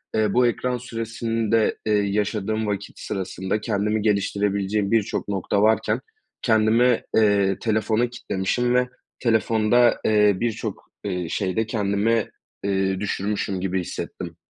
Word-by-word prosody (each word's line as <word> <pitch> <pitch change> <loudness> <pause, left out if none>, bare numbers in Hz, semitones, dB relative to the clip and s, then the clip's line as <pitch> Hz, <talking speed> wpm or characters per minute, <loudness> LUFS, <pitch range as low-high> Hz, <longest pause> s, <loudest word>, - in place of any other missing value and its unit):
eee, 110 -2 +2
bu 125 0 +4
ekran 125 +1 -1
süresinde, 115 -1 -1
eee, 110 - +1
yaşadığım 105 +1 -1
vakit 100 -1 -4
sırasında 95 +1 -3
kendimi 105 0 0
geliştirebileceğim 100 0 0
birçok 110 -3 0
nokta 100 0 0
varken 110 +1 +2 0.4
kendimi, 115 +1 +3
eee, 100 -3 +3
telefona 110 +1 +1
kitlemişim 120 +2 -1
ve 125 0 +2 0.3
telefonda, 115 0 +3
eee, 105 -2 +4
birçok, 115 -2 -4
eee, 90 -4 -3
şeyde 100 +3 -1
kendimi, 105 +1 0 0.3
eee, 95 -1 0
düşürmüşüm 100 -1 -2
gibi 95 0 -1
hissettim. - - -6
105 Hz, 115 wpm, -23 LUFS, 100-115 Hz, 0.4 s, bu